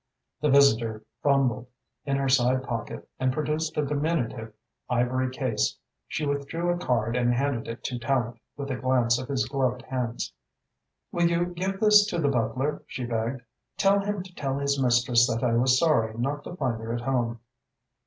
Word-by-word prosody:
The 150 - +2
visitor 115 -6 +4 0.2
fumbled 135 -3 +2 0.4
in 135 0 +1
her 135 0 0
side 130 0 +3
pocket 120 -4 -5
and 130 0 +2
produced 155 +3 -2
a 150 - +2
diminutive 140 -6 -1 0.4
ivory 125 +1 +1
case. 130 - -1 0.3
She 155 - -2
withdrew 145 +5 -1
a 175 - 0
card 115 -6 0
and 120 -1 +2
handed 135 -2 -1
it 115 +1 -7
to 125 - -3
Tallente, 120 -2 -1 0.2
with 140 -1 -4
a 130 - -2
glance 125 -1 +2
at 130 - -7
his 130 -2 0
gloved 130 -2 -1
hands. 125 -3 -3 0.8
"Will 170 -1 +2
you 170 +1 +1
give 185 +2 -3
this 210 -1 +6
to 180 - -2
the 150 -4 +2
butler?" 125 +3 -1
she 125 - -5
begged. 120 +2 -2 0.4
"Tell 200 +1 +4
him 200 -1 -2
to 185 -1 -14
tell 135 -4 -2
his 140 0 0
mistress 120 -1 +4
that 115 0 -2
I 120 -2 +2
was 125 +2 +4
sorry 115 -9 +2
not 140 +4 -2
to 175 - -7
find 125 -8 -2
her 115 +1 -4
at 120 - -3
home." 120 -2 -1
130 Hz, 180 wpm, -26 LUFS, 120-145 Hz, 0.8 s, this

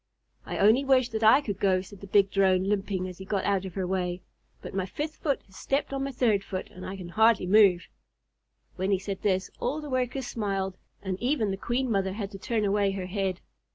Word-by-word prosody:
"I - - -3
only 220 +7 +5
wish 260 -3 +3
that 220 -1 -3
I 225 +6 +7
could 205 -8 -4
go," 185 -2 +2
said 190 +1 -13
the 200 - -9
big 195 0 +3
Drone, 190 -2 +3
limping 195 -2 -1
as 180 0 -9
he - - -6
got 195 -1 -1
out 195 -2 +1
of 185 - -8
her 190 -2 -1
way; 180 -1 -2 0.4
"but - - -9
my 190 -1 -1
fifth 300 +9 -5
foot 280 -4 -1
just 190 -1 -15
stepped 275 0 -1
on 270 0 -1
my 275 - -3
third 225 -6 +2
foot, 185 -1 -5
and 185 - -11
I 195 - -5
can 180 -2 -8
hardly 220 +1 +4
move." 190 -2 +5 0.9
When 190 +1 -1
he 195 - +3
said 195 0 -5
this, 190 -2 0
all 275 +5 -1
the 300 -2 -7
Workers 255 +1 -1
smiled, 195 -5 -2 0.3
and 190 -1 -3
even 245 -5 +1
the - - -1
Queen 240 +5 -1
Mother 190 -2 0
had 200 -1 -5
to 195 - -9
turn 220 +1 -1
away 200 -1 +2
her 190 -2 -4
head. 190 -1 -2
200 Hz, 230 wpm, -27 LUFS, 190-230 Hz, 0.9 s, I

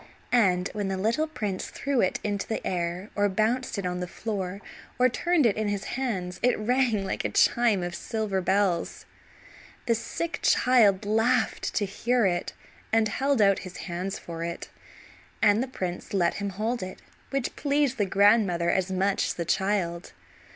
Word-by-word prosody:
And 185 -6 +3
when 205 -2 -2
the 190 0 -2
little 230 +11 +1
prince 210 -11 -4
threw 275 -3 -1
it 185 - +1
into 205 -1 -2
the 220 - -3
air, 180 +2 -3
or 205 0 +2
bounced 220 +5 0
it 200 - -3
on 180 0 -2
the 180 - -3
floor 195 -1 -4 0.4
or 255 +1 +4
turned 335 +4 +1
it 220 - +3
in 215 0 -1
his 205 -1 -2
hands 195 -9 -3
it 250 - +3
rang 230 -2 +1
like - - -3
a - - 0
chime 230 -6 +3
of 175 0 -4
silver 210 -1 -2
bells. 190 -2 0 0.8
The 235 - +3
sick 325 +9 -3
child 215 -6 +4
laughed 225 +3 +1
to 205 - +1
hear 235 +4 +1
it, 175 -2 -1 0.4
and 220 -1 +3
held 270 -1 +2
out 195 -1 +4
his 185 -1 -9
hands 180 +2 -4
for 165 -1 -7
it, 170 0 -5 0.7
and 210 0 +4
the 260 - -2
prince 185 -6 -5
let 175 -3 +2
him 200 - -1
hold 220 +5 -2
it, 185 0 -7 0.3
which 275 -3 -2
pleased 285 -3 0
the 205 - +3
grandmother 195 -3 +3
as 190 0 0
much 190 +1 +1
as - - -1
the 170 - -3
child. 190 -2 -1
205 Hz, 175 wpm, -27 LUFS, 185-235 Hz, 0.8 s, or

